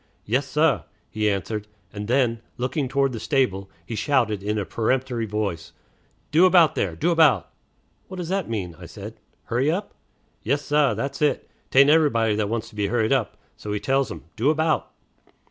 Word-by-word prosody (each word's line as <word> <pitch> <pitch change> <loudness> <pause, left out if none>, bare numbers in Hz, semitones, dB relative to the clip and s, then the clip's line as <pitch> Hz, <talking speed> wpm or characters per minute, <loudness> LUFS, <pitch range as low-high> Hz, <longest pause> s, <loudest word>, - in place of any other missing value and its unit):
"Yes, 130 +6 0
sah," 150 - +2 0.3
he 110 -1 +1
answered; 105 +2 -3 0.3
and 105 0 -5
then, 120 -2 +1 0.2
looking 130 +3 -1
toward 135 0 +1
the 115 - -5
stable, 105 -8 0 0.2
he 115 - -6
shouted 110 -4 +1
in 105 +2 -2
a 105 - -1
peremptory 120 +1 -1
voice, 100 -6 -3 0.6
"Do 170 +5 +6
about, 175 -4 +5
there! 85 -4 -1
Do 170 - +1
about!" 150 - +4 0.6
"What 185 - -8
does 175 -2 -5
that 190 -5 -1
mean?" 95 -7 -3
said 105 +5 -9
I. 110 - -32 0.2
"Hurry 125 +5 0
up?" 190 +6 -2 0.5
"Yes, 140 +5 0
sah, 150 -1 +2
that's 140 +1 -4
it. 150 -1 +1 0.2
'Tain't 140 +2 +6
everybody 115 -9 +3
that 105 -1 -1
wants 115 -1 -2
to - - -18
be 105 -1 0
hurried 110 +2 +1
up; 130 -6 -1 0.2
so 105 - -9
we 105 0 -1
tells 135 +3 +1
'em, - - -8
'Do 120 +6 +2
about!'" 155 0 +1
120 Hz, 180 wpm, -24 LUFS, 105-145 Hz, 0.6 s, Do